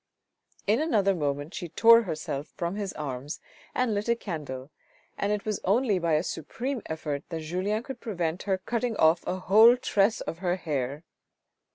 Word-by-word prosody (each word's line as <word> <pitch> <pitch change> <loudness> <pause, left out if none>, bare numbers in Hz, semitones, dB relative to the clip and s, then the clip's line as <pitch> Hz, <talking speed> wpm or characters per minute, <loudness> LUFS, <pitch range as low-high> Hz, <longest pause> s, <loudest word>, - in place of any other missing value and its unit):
In 220 +7 +3
another 210 -11 +2
moment 145 0 -2
she 175 -4 -5
tore 230 +7 +7
herself 155 -7 -4
from 170 +2 -2
his 205 -2 -3
arms, 140 0 -5 0.4
and 250 -3 +1
lit 205 +3 -2
a 235 - +4
candle, 150 - -6 0.4
and 200 - -1
it 210 -1 -1
was 215 -2 -1
only 205 0 +2
by 170 -2 +1
a 155 +2 +3
supreme 240 - -4
effort 150 -3 -3
that 165 -2 -4
Julien 185 +7 -1
could 265 -2 -7
prevent 175 -6 -2
her 190 - +3
from 185 - -34
cutting 235 -1 -1
off 160 +2 +4
a - - 0
whole 220 +6 +6
tress 210 -2 +2
of 165 - -5
her 180 -1 0
hair. 145 -4 -3
185 Hz, 180 wpm, -27 LUFS, 155-215 Hz, 0.4 s, tore